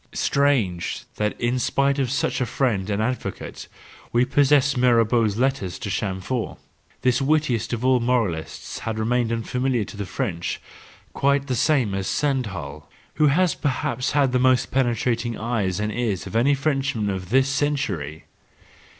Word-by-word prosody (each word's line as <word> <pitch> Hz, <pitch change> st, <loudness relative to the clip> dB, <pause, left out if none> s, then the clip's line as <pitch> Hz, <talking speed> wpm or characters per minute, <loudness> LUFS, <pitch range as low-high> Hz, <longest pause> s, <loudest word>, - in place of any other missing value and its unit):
—Strange, 115 Hz, -, +1 dB
that 105 Hz, 0 st, -1 dB
in 120 Hz, +1 st, 0 dB
spite 140 Hz, +3 st, +1 dB
of 130 Hz, -3 st, 0 dB
such 135 Hz, 0 st, 0 dB
a -, -, +2 dB
friend 110 Hz, -6 st, 0 dB
and 105 Hz, +1 st, 0 dB
advocate—we 125 Hz, 0 st, -4 dB
possess 140 Hz, 0 st, +3 dB
Mirabeau's 115 Hz, -3 st, +3 dB
letters 130 Hz, -7 st, 0 dB
to 100 Hz, -, -5 dB
Chamfort 95 Hz, +5 st, -2 dB, 0.2 s
— -, -, -35 dB
this 125 Hz, +1 st, +3 dB
wittiest 135 Hz, -5 st, +1 dB
of 120 Hz, +1 st, -2 dB
all 130 Hz, -1 st, +4 dB
moralists 115 Hz, -10 st, -2 dB
has 110 Hz, -, -3 dB
remained 115 Hz, +1 st, 0 dB
unfamiliar 125 Hz, +1 st, 0 dB
to 100 Hz, -, -10 dB
the 100 Hz, -2 st, -5 dB
French, 90 Hz, -5 st, -3 dB, 0.5 s
quite 140 Hz, 0 st, +2 dB
the 130 Hz, -, -2 dB
same 125 Hz, -5 st, +2 dB
as 95 Hz, -1 st, -2 dB
Stendhal, 95 Hz, -, -2 dB, 0.3 s
who 150 Hz, -, +6 dB
has 170 Hz, +4 st, +3 dB
perhaps 130 Hz, -3 st, -1 dB
had 140 Hz, -3 st, +3 dB
the 125 Hz, -, +2 dB
most 130 Hz, 0 st, +3 dB
penetrating 120 Hz, -2 st, 0 dB
eyes 110 Hz, -5 st, -1 dB
and 105 Hz, 0 st, -1 dB
ears 110 Hz, -6 st, -2 dB
of 95 Hz, -, -8 dB
any 135 Hz, +5 st, +4 dB
Frenchman 135 Hz, -7 st, 0 dB
of 95 Hz, -2 st, -5 dB
this 130 Hz, +3 st, +4 dB
century. 135 Hz, -, -2 dB
120 Hz, 150 wpm, -23 LUFS, 105-135 Hz, 0.5 s, who